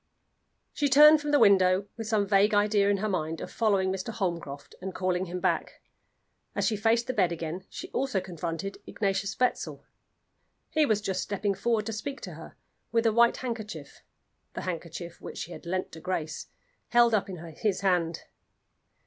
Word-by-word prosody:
She 290 -1 +1
turned 300 +3 +8
from 295 - -3
the 290 - +5
window 195 -4 +5
with 225 -2 -6
some 215 -2 +2
vague 200 +1 +4
idea 205 -1 +3
in 200 - +3
her 215 +3 -1
mind 165 -5 -2
of - - -7
following 200 -4 +2
Mr. 190 +3 -4
Holmcroft 170 -9 -4
and 190 0 -5
calling 185 0 0
him 180 0 -5
back. - - -1 0.8
As - - +1
she 225 - +2
faced 225 +3 +2
the 255 - -2
bed 185 -6 +2
again 170 +2 -5
she - - -7
also 265 -7 0
confronted 180 +1 -5
Ignatius 200 -1 -1
Wetzel. 250 -1 -1 0.9
He 310 -2 +3
was 215 -2 +2
just 190 -3 -2
stepping 200 0 -1
forward 225 0 0
to 225 - -3
speak 275 +6 -5
to - - -7
her, - - -11 0.4
with 230 0 +2
a 225 - +4
white 235 +1 +5
handkerchief 225 -4 -6 0.5
the - - -3
handkerchief 170 -1 -6
which - - -8
she 175 - -5
had 175 - -9
lent 185 +1 -2
to 160 - -9
Grace 160 -3 -3 0.4
held 240 -1 +4
up 205 -2 +1
in 185 - -6 0.2
his 205 -4 0
hand. 175 -4 +1
200 Hz, 180 wpm, -28 LUFS, 180-225 Hz, 0.9 s, turned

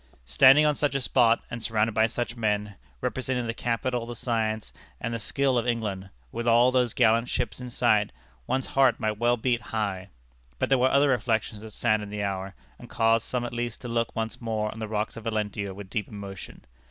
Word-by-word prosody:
Standing 135 - +6
on 150 - +4
such 145 -1 -1
a - - +2
spot, 120 -3 +3
and 115 - -5
surrounded 110 0 +1
by 110 +1 +3
such 120 +1 -4
men, 105 -3 -1 0.3
representing 130 -1 -1
the 115 - -2
capital, 120 0 -2
the 120 - -6
science, 110 -2 -2 0.3
and 115 - -3
the 115 - -2
skill 130 +3 +1
of 120 - -3
England, 105 -5 -2 0.2
with 120 0 -4
all 120 +2 +5
those 125 -3 +1
gallant 115 0 +3
ships 125 0 -2
in 125 - -6
sight, 110 -4 +2 0.4
one's 130 0 0
heart 135 -3 +3
might 110 -1 -2
well 120 +1 +3
beat 120 0 0
high. 100 -5 -3 0.5
But - - -1
there 135 -1 +4
were 130 +1 +4
other 140 +1 +4
reflections 110 -4 0
that 110 - -9
saddened 110 -2 0
the 105 -1 -3
hour, 95 -1 -3 0.2
and - - -12
caused 115 0 +2
some 125 -1 -2
at 120 - -6
least 120 -1 -3
to 125 - -6
look 115 -1 -1
once 115 +1 -3
more 110 -2 -2
on 110 - -9
the 110 - -4
rocks 105 +1 -3
of 115 - -9
Valentia 105 -3 -2
with 100 +1 -9
deep 105 -3 -2
emotion. 100 -2 -9
115 Hz, 210 wpm, -26 LUFS, 105-125 Hz, 0.5 s, Standing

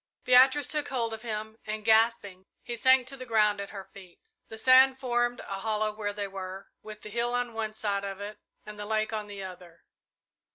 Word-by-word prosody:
Beatrice 260 +3 +5
took 300 -1 -1
hold 235 -4 -1
of 220 - -6
him, 220 -1 -5
and, 215 0 -5
gasping, 220 -4 +2 0.2
he 240 - -5
sank 260 +2 +4
to 270 +2 -7
the 255 - -8
ground 210 -3 +2
at 200 - -7
her 195 -2 -9
feet. 195 - -16 0.2
The 220 - -9
sand 260 +2 +6
formed 240 -2 0
a 195 0 -6
hollow 215 0 -1
where 210 -1 -4
they 205 0 -4
were, 190 0 -8
with 215 0 -10
the 210 - -8
hill 240 +2 -1
on 245 -1 -2
one 220 -1 -3
side 200 -2 -2
of 195 -1 -5
it 205 +1 -7 0.3
and 210 0 -10
the 205 - -5
lake 215 0 -1
on 215 -1 -3
the 200 -1 -7
other. 180 -2 -11
215 Hz, 210 wpm, -28 LUFS, 205-240 Hz, 0.3 s, sand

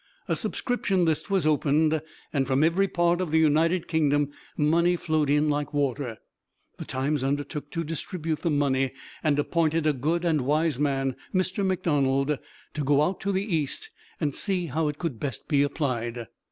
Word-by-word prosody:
A - - +1
subscription 195 -7 0
list 160 +3 0
was 195 -5 +1
opened, 155 +1 +2 0.3
and 135 -3 +1
from 135 +2 +2
every 175 +5 +3
part 175 0 +1
of 180 - -2
the 160 - +2
United 160 +3 +3
Kingdom 145 -3 +2 0.3
money 170 +4 +3
flowed 155 -4 0
in 150 +1 +3
like 145 -1 -1
water. 135 -4 -1 0.6
The - - -5
Times 135 +2 -1
undertook 145 +1 -2
to 165 +1 -3
distribute 160 0 -4
the 170 - 0
money, 135 -3 +1 0.3
and 150 -3 +2
appointed 160 +1 +1
a 155 - +3
good 160 +6 -1
and 160 -4 +2
wise 150 +1 +1
man, 135 -3 0 0.2
Mr. 185 +2 0
McDonald, 145 -7 +1 0.3
to 150 - -2
go 145 +1 +3
out 180 +4 -1
to 200 - -1
the 190 +1 0
East 180 - -2 0.3
and 150 -4 0
see 185 0 -1
how 155 +1 -1
it 150 -1 -3
could 150 -10 -4
best 135 -6 -4
be 145 -3 +3
applied. 125 -5 -1
150 Hz, 175 wpm, -26 LUFS, 140-170 Hz, 0.6 s, every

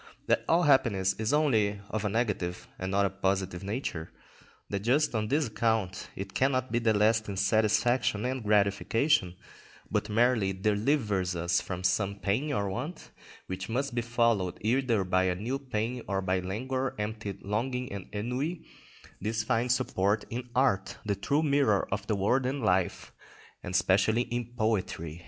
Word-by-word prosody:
That - - +2
all 170 +2 +4
happiness 110 - +3
is 110 -1 0
only 110 -9 +2
of 110 -1 -2
a 105 - 0
negative 100 -5 -2
not 95 +2 +1
a - - +1
positive 95 -2 -1
nature, 100 -6 -4 0.6
that 100 - -2
just 130 +9 +2
on 110 -2 0
this 145 +5 +2
account 110 -4 -1
it 95 0 -6
cannot 130 -1 +1
be 120 - +2
lasting 110 -2 +2
satisfaction 110 +3 +2
and 130 0 -2
gratification, 105 - +2 0.6
but 105 0 0
merely 110 -3 +2
delivers 105 -2 0
us 85 +1 +1
from 90 -1 -5
some 95 +2 +1
pain 110 +10 -1
or 100 -7 0
want 145 - -5 0.3
which 95 +2 -5
must 135 +3 -1
be 120 - 0
followed 115 -6 +1
either 115 -2 +2
by 95 0 +2
a 90 -1 +1
new 120 +9 -3
pain, 125 -2 -3
or 100 -1 0
by 95 0 +1
languor, 130 +8 -3
empty 105 -1 -4
longing, 125 +5 -2
and 100 -2 -6
ennui; 125 +11 -3 0.6
this 110 +2 -1
finds 125 +2 +2
support 105 -4 0
in 125 +1 -5
art, 115 -8 +1
that 100 -2 -2
true 145 +3 +1
mirror 140 -9 +2
of 105 +1 -3
the 110 - +1
world 125 +7 +1
and 135 -1 -2
life, 95 -4 0 0.5
and 90 - -5
especially 110 +5 +3
in 120 -1 -4
poetry. 95 -7 -1
110 Hz, 155 wpm, -29 LUFS, 95-125 Hz, 0.6 s, all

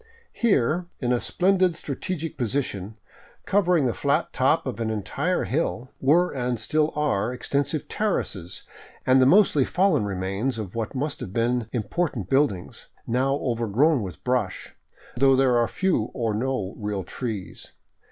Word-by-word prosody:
Here, 175 - +1
in 125 -1 +1
a 120 - +2
splendid 185 -1 +2
strategic 160 +3 -4
position, 115 -5 -2 0.5
covering 180 -6 +3
the 120 - +1
flat 140 +3 0
top 135 +4 +2
of 130 -3 -4
an 115 -1 -1
entire 140 - -1
hill, 130 -3 -2
were 165 +7 +3
and 125 -3 -2
still 155 +7 +1
are 125 -7 0
extensive 140 +3 -2
terraces 100 - -2 0.4
and 130 0 +5
the 130 - +6
mostly 175 -4 +5
fallen 175 - +2
remains 100 +6 -2
of 105 -5 -5
what 115 +2 -4
must 145 +3 -2
have 95 - -7
been 115 0 0
im 120 -4 -1
portant 130 - -2
buildings, 135 -10 0 0.2
now 130 +4 +1
overgrown 120 +4 +2
with 95 -3 -7
brush, 125 -7 -1 0.4
though 135 +1 +5
there 130 -2 +3
are 120 -1 +3
few 180 - 0
or 115 -3 -1
no 110 -3 -2
real 105 -2 -3
trees. 105 0 -6
130 Hz, 150 wpm, -25 LUFS, 110-150 Hz, 0.5 s, the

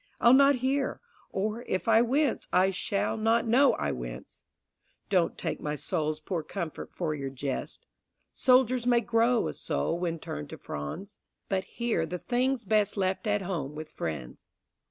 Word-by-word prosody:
I'll 235 - +6
not 275 +1 +7
hear; 270 +1 0 0.3
Or, 215 +4 -2
if 185 - -2
I 225 0 +6
wince, 265 +3 +1
I 190 +1 +4
shall 195 +3 -1
not 225 +2 +2
know 255 +4 +5
I 70 - -1
wince. - - -7 0.7
Don't 180 -4 +2
take - - -3
my 150 0 -2
soul's 155 +1 -2
poor 165 +2 -3
comfort 165 0 -5
for 165 -4 -2
your 140 -2 -4
jest. 135 0 -5 0.5
Soldiers 255 -1 +3
may 240 -1 +4
grow 230 +1 +2
a - - -3
soul 170 - -2
when 170 -2 -1
turned 75 - -6
to - - -8
fronds, 75 - -7 0.3
But 190 -1 0
here 230 -9 0
the 180 - -3
thing's 250 +4 0
best 210 0 +2
left 190 +2 0
at 205 -1 +1
home 155 -6 -3
with 155 0 -7
friends. 75 -7 -6
195 Hz, 165 wpm, -29 LUFS, 155-235 Hz, 0.7 s, not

